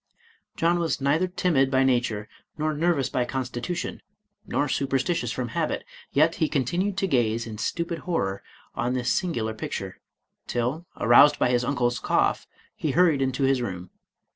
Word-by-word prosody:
John 170 +1 +2
was 165 -2 0
neither 145 +6 +2
timid 175 -7 +2
by 135 0 +3
nature, 120 -5 +1 0.3
nor 155 0 0
nervous 155 -3 +1
by 125 - 0
constitution, 130 +6 -4 0.5
nor 145 - 0
superstitious 135 -1 0
from 125 -2 -3
habit, - - -2 0.3
yet 155 +4 +4
he 160 - +1
continued 175 +8 0
to 195 - +1
gaze 115 -6 +1
in 110 -2 -7
stupid 170 +4 -2
horror 100 - -2 0.3
on 120 +1 -1
this 125 0 +1
singular 120 -12 -1
picture, 110 - -5 0.5
till, 125 +8 -2
aroused 145 +5 +6
by - - +2
his 120 0 +2
uncle's 125 -2 0
cough, - - +1 0.3
he 150 -4 -2
hurried 165 -5 +4
into 130 0 0
his 135 -1 +3
room. 90 -5 -5
135 Hz, 155 wpm, -25 LUFS, 120-165 Hz, 0.5 s, aroused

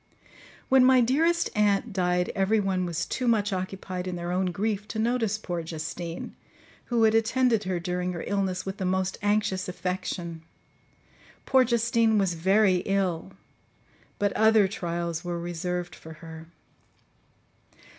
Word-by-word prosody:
"When 265 -1 +5
my 260 0 +6
dearest 320 +8 +2
aunt 210 +1 +2
died 180 -1 +1
every 195 +3 +2
one 190 -2 0
was 170 -2 -2
too 255 - -3
much 210 -3 +2
occupied 185 -1 -4
in 180 - -3
their 175 0 -4
own 185 +1 +1
grief 205 +3 -2
to 220 - -6
notice 225 -2 +1
poor 175 -5 -4
Justine, 165 +1 -6 0.5
who 235 -2 +1
had 220 0 +5
attended 225 -1 +2
her 185 -2 -1
during 180 +1 -2
her 170 - -5
illness 190 -2 -1
with 190 +1 -5
the 190 - -4
most 185 +1 -1
anxious 205 -3 0
affection. 180 -2 -4 1.0
Poor 265 -1 +5
Justine 230 -2 +2
was 195 -3 +2
very 190 +3 +3
ill; 190 -2 -1 0.8
but 205 -1 0
other 220 -2 +5
trials 170 -3 -3
were 175 -1 -3
reserved 175 +1 -3
for 160 - -11
her. 160 +1 -11
190 Hz, 145 wpm, -27 LUFS, 180-220 Hz, 1.0 s, my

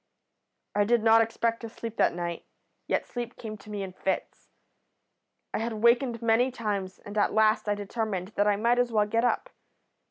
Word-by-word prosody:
"I 205 - +3
did 230 +1 +2
not 225 0 +6
expect 230 0 0
to 230 - -6
sleep 230 0 -7
that - - +3
night, 170 -1 -4 0.4
yet - - 0
sleep 240 -1 -6
came 215 -2 -6
to 215 - -14
me 205 -1 -3
in 190 -1 -7
fits. 190 +1 -3 1.0
I - - 0
had 230 +1 -2
wakened 235 0 +3
many 230 +3 +3
times, 205 -6 -3
and 205 - -10
at - - +2
last 215 -1 +3
I 205 - +2
determined 205 -2 -3
that 205 -1 +1
I 205 - +4
might 235 +4 +2
as 245 -1 +1
well 210 -2 +3
get 230 +3 0
up. - - 0
220 Hz, 190 wpm, -28 LUFS, 205-235 Hz, 1.0 s, not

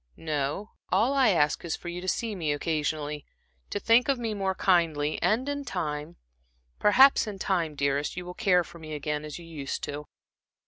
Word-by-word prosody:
No, 155 +6 -2 0.2
all 250 +5 +3
I 270 -4 +4
ask 150 -6 +2
is 170 - -2
for - - -11
you 175 +1 -4
to 185 - -7
see 225 +4 -1
me 165 -6 -1
occasionally, 150 -1 -2 0.5
to - - -2
think 230 +6 +4
of 275 - +3
me 230 -2 -2
more 195 -2 -1
kindly, 160 -6 +1
and 240 +5 +2
in 285 0 -2
time 155 - -4 0.6
perhaps 260 +4 +6
in 205 -2 -5
time, 175 -5 -1
dearest, 140 +3 -1
you 180 - -4
will 180 - -7
care 180 -3 +3
for 170 - -13
me 155 -1 -6
again 150 +1 -3
as 150 -1 -6
you 170 - -11
used 150 -5 -5
to." 145 +1 -5
170 Hz, 190 wpm, -28 LUFS, 150-205 Hz, 0.6 s, perhaps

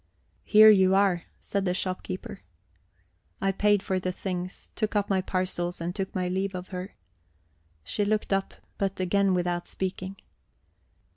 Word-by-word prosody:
"Here 215 0 +9
you 190 -2 +5
are," 195 -3 +2
said 200 -1 -2
the 180 -1 0
storekeeper. 185 0 -4 1.0
I 195 0 +1
paid 205 0 +2
for 190 -2 0
the 185 0 -2
things, 180 0 -5
took 215 -1 -1
up 205 -1 +1
my 190 -1 +3
parcels, 185 -1 -2
and 170 +1 -3
took 195 -1 -4
my 185 -1 0
leave 190 +1 -1
of 180 0 -6
her. 185 +1 -6 0.9
She 205 - -1
looked 210 0 0
up, 195 0 -1 0.2
but 195 -1 -1
again 190 +1 +2
without 175 -1 -1
speaking. 190 0 -4
190 Hz, 150 wpm, -27 LUFS, 180-200 Hz, 1.0 s, Here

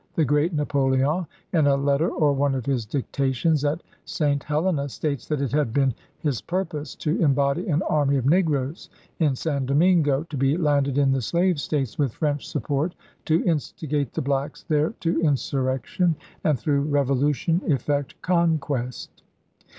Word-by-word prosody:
The 160 - +3
great 150 +4 +2
Napoleon, 145 +2 +1 0.3
in 155 -4 +4
a 140 - +4
letter 140 +3 +1
or 150 -4 +2
one 140 0 +1
of 130 -3 -3
his 125 -6 -1
dictations 140 +3 0
at 150 +4 -1 0.2
St. 145 -2 0
Helena, 150 -1 0
states 140 0 -3
that 150 -3 -1
it 140 - -1
had 145 -6 0
been 135 -2 +2 0.2
his 140 -8 -2
purpose 165 -4 -3
to 155 +5 -1
embody 140 +2 +2
an 165 +1 +1
army 145 -2 +2
of 130 - -2
negroes 150 -2 +1 0.3
in 150 -5 +2
San 140 -2 -2
Domingo, 150 -1 +3
to 160 -3 -8
be 135 +4 +2
landed 145 -4 +1
in 140 -1 +3
the 135 -1 +1
slave 170 - +1
States 135 -6 -2
with 135 -6 +1
French 145 -2 -2
support 145 +5 -2 0.3
to 160 +2 +2
instigate 150 -3 -1
the - - -2
blacks 140 +1 -2
there 155 +7 +1
to 165 0 +1
in 155 -4 +3
surrection, 135 +7 -1 0.3
and 150 -4 +2
through 140 +4 +1
revolution 145 +3 +1
effect 145 -2 -1
conquest. 155 - -1
145 Hz, 160 wpm, -24 LUFS, 135-160 Hz, 0.3 s, in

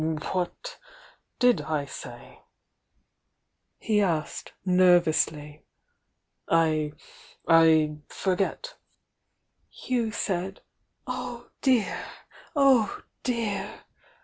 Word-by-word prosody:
"What 190 - -4 0.6
did 245 -1 +4
I 150 -2 -2
say?" - - -10 1.4
he 210 -2 +1
asked, 165 -6 -2
nervously. 170 -5 +3 0.9
"I— 155 -2 +2 0.5
I 160 -2 +5
forget 195 - -2 0.5
" - - -48 0.2
"You 240 -3 0
said— 190 -1 -3 0.4
oh, 240 -1 -6
dear, 250 -7 +1 0.5
oh, 265 -7 +3 0.2
dear! 230 -5 -3
185 Hz, 70 wpm, -26 LUFS, 160-235 Hz, 1.4 s, I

